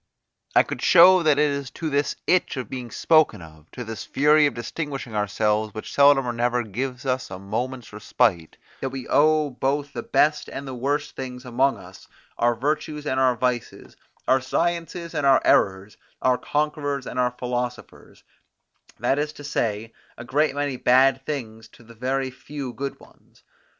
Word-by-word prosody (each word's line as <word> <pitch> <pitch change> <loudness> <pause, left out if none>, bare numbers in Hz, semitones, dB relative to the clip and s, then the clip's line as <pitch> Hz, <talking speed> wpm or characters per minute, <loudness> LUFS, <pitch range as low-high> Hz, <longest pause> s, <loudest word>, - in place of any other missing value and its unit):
I - - +7
could - - -6
show 185 +1 +7
that 155 -3 +3
it 150 0 +3
is 140 -2 -4
to 165 - -3
this 145 -1 0
itch 180 -5 +1
of 125 -5 -5
being 125 -2 -5
spoken 155 - +3
of, 80 -2 -15
to 125 - -7
this 110 -2 -6
fury 150 +2 +4
of - - -4
distinguishing 130 0 -5
ourselves 105 +1 0
which 110 - -7
seldom 140 -1 +5
or 120 - -1
never 120 +1 0
gives 125 +5 -5
us 130 0 -1
a 95 - -7
moment's 115 +5 -5
respite, 105 -5 0 0.2
that 135 - -3
we 130 -1 -7
owe 155 -1 +3
both 140 +2 -2
the - - -4
best 150 0 +1
and 140 0 -7
the 130 - -5
worst 140 +4 -2
things 125 -1 -7
among 130 +3 +1
us, - - -14 0.3
our 120 0 +3
virtues 150 +3 -2
and 130 -2 0
our 130 -1 +3
vices, 125 0 -3 0.3
our 130 0 +4
sciences 170 +4 -2
and 145 - -2
our 135 -1 +6
errors, 95 +2 +2 0.3
our 125 -1 +3
conquerors 145 -2 -2
and 125 - -5
our 125 -1 +1
philosophers; 125 0 -5 0.8
that 135 - +1
is 150 +1 -1
to 145 - -12
say, 115 -5 -2 0.2
a 120 - -9
great 145 +2 +1
many 145 -2 -2
bad 130 +2 +4
things 115 -7 -5
to 120 - -19
a 115 - -13
very 130 +3 -2
few 135 0 -7
good 140 +2 -5
ones. - - -22
130 Hz, 175 wpm, -24 LUFS, 120-145 Hz, 0.8 s, I